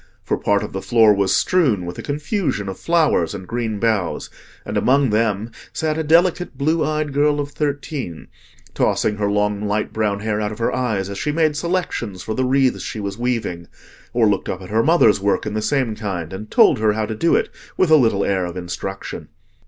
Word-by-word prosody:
For - - 0
part 100 0 +1
of - - -7
the 95 - -3
floor 110 -2 +5
was 100 -1 +2
strewn 130 - +2
with 85 0 -6
a - - -3
confusion 150 - -2
of 95 - -6
flowers 155 - +2
and 95 -2 -8
green 115 -2 -2
boughs, 105 -5 -1 0.3
and - - -5
among 135 -1 +3
them 110 0 0 0.2
sat 155 -1 -1
a 160 - -1
delicate 170 +3 +2
blue 155 +3 +1
eyed 150 -1 -1
girl 145 +1 +2
of 145 0 -3
thirteen, 140 - -4 0.5
tossing 105 - +1
her 100 -1 0
long 105 0 0
light 105 +1 -1
brown 105 -2 -1
hair 105 0 -1
out 105 0 -2
of 105 - -7
her 115 - 0
eyes, 110 -7 -1
as 100 0 -6
she 150 - -1
made 155 -1 +1
selections 145 - -2
for 110 - -3
the 130 +3 0
wreaths 130 0 +2
she 110 - -5
was 100 +1 -5
weaving, 115 -9 -2 0.4
or 120 -2 +2
looked 100 -2 0
up 95 0 -4
at 90 - -10
her 110 +1 +3
mother's 145 -9 +4
work 100 +1 0
in 105 - -3
the 110 - -1
same 130 -3 0
kind, 95 -6 -4
and 105 +3 -7
told - - +5
her 110 -1 +2
how 110 0 -1
to 110 - -4
do 165 +10 +2
it - - +1 0.3
with 185 -4 +2
a - - +9
little 110 -8 +3
air 95 -2 0
of 85 +1 -7
instruction. 90 +2 -6
110 Hz, 215 wpm, -20 LUFS, 100-145 Hz, 0.5 s, a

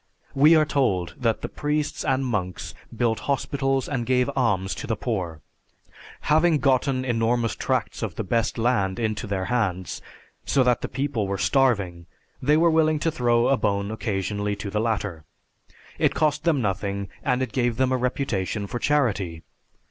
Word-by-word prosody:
_ - - -46 0.3
We 150 +4 +6
are 155 -1 +5
told 95 - 0
that 115 -3 0
the - - -1
priests 150 +1 -2
and 135 0 +1
monks 95 -7 -3 0.2
built 115 -2 +1
hospitals 135 -1 0
and 130 -4 -2
gave 125 +2 +1
alms 95 -7 +1
to - - -6
the 115 - 0
poor. 90 -9 -3 0.8
Having 160 +1 +3
gotten 130 -1 +1
enormous 115 -2 +1
tracts - - -2
of - - -3
the - - -3
best 115 +4 0
land 115 -5 +1
into 110 -1 -2
their 95 -2 -2
hands, 95 -7 -1 0.4
so 135 - +2
that 125 -2 +2
the - - -2
people 130 -5 -2
were 100 0 -2
starving, 100 -11 +1 0.3
they 150 +4 +3
were 165 +1 +4
willing 155 -1 +3
to 165 +2 0
throw 120 -4 +2
a 135 - +3
bone 100 -2 -1
occasionally 100 -1 -2
to 100 0 -6
the 105 +1 0
latter. 100 -8 -2 0.8
It - - +2
cost 150 0 +1
them 150 -7 +2
nothing 100 0 -2
and 125 +1 +1
it 130 - -4
gave 120 -3 0
them 130 0 +2
a 130 - +2
reputation 120 -6 -2
for 120 +5 -4
charity. 105 - 0
120 Hz, 170 wpm, -24 LUFS, 100-135 Hz, 0.8 s, We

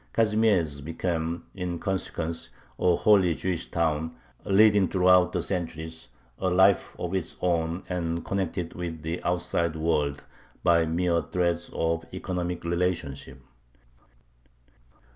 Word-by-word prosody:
Kazimiezh 105 -10 +2
became, 80 +1 -2
in 90 -2 -3
consequence, 85 -3 -3 0.3
a 90 -1 +4
wholly 95 -5 +4
Jewish 90 -1 -3
town, 80 -1 -1 0.3
leading 105 -1 +5
throughout 90 0 +4
the - - -1
centuries 80 -3 -4 0.3
a 95 - +1
life 95 +2 +4
of 90 +1 -4
its 95 -4 -3
own, 85 0 0
and 85 -2 -2
connected 90 -3 -2
with 85 -3 -5
the 80 +2 -3
outside 85 -2 0
world 75 -3 0 0.4
by 85 -1 +4
mere 85 +1 +1
threads 85 -1 0
of 80 0 -1
economic 90 -1 -3
relationship. 85 -7 -2
85 Hz, 115 wpm, -27 LUFS, 80-90 Hz, 0.4 s, leading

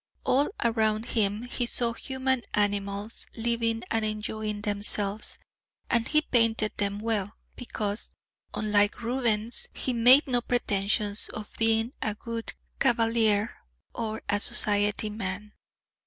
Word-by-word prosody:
All 275 +3 +3
around 220 -1 +1
him 210 -1 +1
he 245 0 -2
saw 235 -1 +1
human 260 +1 -1
animals... 205 +1 -2
living 230 0 0
and 225 -1 +1
enjoying 215 0 -3
themselves, 205 0 0 0.5
and 235 -2 +2
he 305 0 +4
painted 230 -4 +2
them 200 0 -1
well, 215 -3 -1 0.2
because, 210 -3 -4 0.4
unlike 210 +2 +1
Rubens, 235 -2 +1
he 255 - -1
made 250 +5 +7
no 245 -2 +1
pretensions 205 -3 0
of 215 -1 -8
being 225 +2 +2
a 215 -1 -1
good 230 +1 -6 0.2
cavalier 225 -4 +2 0.4
or 220 -1 -4
a 205 0 +1
society 205 +1 +1
man.... 205 0 -5
220 Hz, 120 wpm, -27 LUFS, 205-235 Hz, 0.5 s, made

